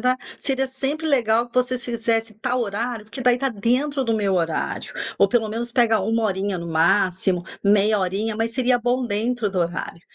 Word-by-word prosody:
ta. - - -20 0.2
Seria 265 -1 0
sempre 275 +4 -2
legal 240 -4 +2
que 240 - -22
vocês 250 0 +2
fizessem 225 -2 -1
tal 250 +1 0
horário, 225 +1 -3
porque 230 +4 -9
daí, 245 -1 +4
tá 270 +1 0
dentro 255 +6 0
do 230 -2 0
meu 200 -3 +1
horário. 165 -2 -2 0.2
Ou, - - +5
pelo 225 -3 +1
menos, 235 +2 -4
pegar 230 -4 +3
1 225 +3 0
horinha 195 -1 -1
no 170 - -6
máximo, 180 +2 +2 0.2
meia 205 +1 +4
horinha, 200 +4 -1
mas 225 +1 0
seria 250 +1 +2
bom 245 +1 0
dentro 225 +1 -1
do 190 - -4
horário. 170 0 -3
225 Hz, 190 wpm, -22 LUFS, 200-250 Hz, 0.2 s, Ou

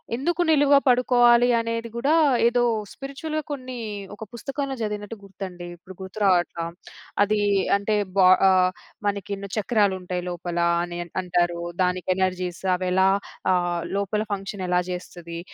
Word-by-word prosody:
ఎందుకు 340 +7 -1
నిలువుగా 290 -2 +5
పడుకోవాలి? 245 -1 +5
అనేది 230 0 -3
గూడా 270 +5 +1 0.4
ఏదో 240 +1 +2 0.3
స్పిరిచువల్‌గా 305 +3 -5
కొన్నీ 255 -3 -5 0.4
ఒక 220 - -8
పుస్తకంలో 275 +3 -4
చదివినట్టు 210 +1 -4
గుర్తండి 185 -2 -8
ఇప్పుడు 180 +2 -13
గుర్తురావట్ల. 190 -3 +1 0.7
అదీ 210 +1 +1 0.4
అంటే 205 +1 -1 0.2
బ - - -5 0.3
ఆహ్, 185 -1 +4 0.4
మనకి 200 0 -2
ఎన్నో 200 0 -7
చక్రాలుంటాయి 190 -5 0
లోపల 175 0 -5 0.3
అని 175 0 -5 0.2
అంటారు. 175 -1 0 0.2
దానికి 180 0 -1
ఎనర్జీస్ 185 -2 -2
అవెలా 185 +1 +2 0.4
ఆహ్, 175 -1 0 0.2
లోపల 200 +1 -1
ఫంక్షనెలా 190 -2 -1
జేస్తది? 175 -2 -7
195 Hz, 120 wpm, -24 LUFS, 180-235 Hz, 0.7 s, నిలువుగా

